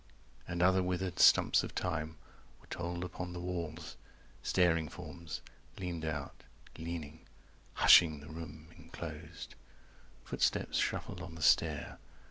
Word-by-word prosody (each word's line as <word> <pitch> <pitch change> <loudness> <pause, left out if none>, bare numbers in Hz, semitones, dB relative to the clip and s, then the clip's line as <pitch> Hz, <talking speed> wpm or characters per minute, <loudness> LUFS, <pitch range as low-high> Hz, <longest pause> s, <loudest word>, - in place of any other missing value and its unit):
And 85 0 -1
other 95 +1 +5
withered 90 0 -2
stumps - - +6
of - - -7
time 80 -3 -2 0.4
Were - - -21
told 85 +1 -4
upon 90 0 -5
the 90 - -5
walls; 85 -3 -5 0.4
staring 85 -4 +2
forms 85 +1 -8 0.4
Leaned 85 -4 -4
out, 75 -3 -4 0.3
leaning, 80 -2 -6 0.5
hushing 80 -4 +7
the 75 - -12
room 80 -1 -9
enclosed. 80 -1 -8 0.7
Footsteps - - 0
shuffled 90 - -2
on 90 -2 -8
the 80 - -5
stair. - - +2
85 Hz, 120 wpm, -33 LUFS, 80-90 Hz, 0.7 s, hushing